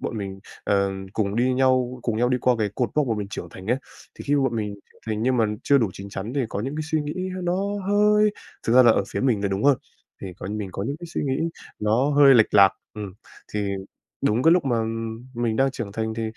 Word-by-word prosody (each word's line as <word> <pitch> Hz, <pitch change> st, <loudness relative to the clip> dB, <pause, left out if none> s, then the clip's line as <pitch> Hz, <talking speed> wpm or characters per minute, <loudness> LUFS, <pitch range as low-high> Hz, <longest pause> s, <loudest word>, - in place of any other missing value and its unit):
bọn 115 Hz, -, -4 dB
mình, 95 Hz, -1 st, -5 dB, 0.3 s
ờ, 100 Hz, -1 st, +2 dB, 0.2 s
cùng 100 Hz, -2 st, -1 dB
đi 125 Hz, +2 st, +2 dB
nhau 130 Hz, -1 st, +2 dB
cùng 115 Hz, -2 st, -1 dB
nhau 120 Hz, +2 st, +2 dB
đi 125 Hz, 0 st, +1 dB
qua 125 Hz, +1 st, +3 dB
về 105 Hz, -2 st, +1 dB
cột 120 Hz, -4 st, 0 dB
mốc 150 Hz, -2 st, +2 dB
mà 115 Hz, -, 0 dB
mình 100 Hz, -1 st, -4 dB
trưởng 85 Hz, -5 st, -6 dB
thành 95 Hz, +3 st, -11 dB
ấy. 120 Hz, -, +2 dB, 0.4 s
Thì -, -, -9 dB
khi 145 Hz, -, +1 dB
mà -, -, +2 dB
bọn 120 Hz, -3 st, 0 dB
mình 105 Hz, -2 st, -2 dB
trưởng 100 Hz, -, -21 dB
thành 110 Hz, -1 st, -2 dB
nhưng 130 Hz, +1 st, +2 dB
mà 115 Hz, -, +3 dB, 0.2 s
chưa 140 Hz, -1 st, +4 dB
đủ 110 Hz, -5 st, +1 dB
chín 95 Hz, +2 st, -9 dB
chắn 100 Hz, +3 st, -5 dB
để 135 Hz, -4 st, 0 dB
có 100 Hz, -, -3 dB
những 135 Hz, +6 st, -4 dB
cái 155 Hz, -, -2 dB
suy 155 Hz, -, +2 dB
nghĩ 185 Hz, +6 st, -4 dB
nó 175 Hz, 0 st, 0 dB, 0.3 s
hơi 210 Hz, +1 st, +4 dB, 0.4 s
thực 115 Hz, -, +2 dB
ra 130 Hz, +1 st, +8 dB
là 120 Hz, -, +7 dB
ở -, -, +1 dB
phía -, -, -3 dB
mình 120 Hz, -6 st, +1 dB
là 100 Hz, -, +1 dB
đúng 95 Hz, +4 st, -2 dB
hơn, 140 Hz, -2 st, +5 dB, 0.4 s
thì 95 Hz, -, -6 dB
coi -, -, -6 dB
như 105 Hz, -, -3 dB
mình 105 Hz, -2 st, -4 dB
có 100 Hz, -, -4 dB
những 140 Hz, +7 st, -3 dB
cái 175 Hz, -, -7 dB
suy 165 Hz, -, -3 dB
nghĩ 145 Hz, +5 st, 0 dB, 0.3 s
nó 115 Hz, +7 st, +2 dB
hơi 140 Hz, -2 st, +7 dB
lệch 110 Hz, -3 st, +4 dB
lạc, 100 Hz, -2 st, +7 dB, 0.2 s
ừm. 105 Hz, -3 st, -6 dB, 0.4 s
Thì 105 Hz, -1 st, -1 dB, 0.5 s
đúng 115 Hz, +4 st, +2 dB
cái 165 Hz, -, +6 dB
lúc 180 Hz, -, +3 dB
mà, 120 Hz, -4 st, +1 dB
ừm, 115 Hz, +1 st, -4 dB
mình 115 Hz, -2 st, -1 dB
đang 135 Hz, 0 st, +3 dB
trưởng 115 Hz, -6 st, -6 dB
thành 110 Hz, 0 st, -2 dB
thì, 115 Hz, -, -3 dB
115 Hz, 270 wpm, -24 LUFS, 105-135 Hz, 0.5 s, ra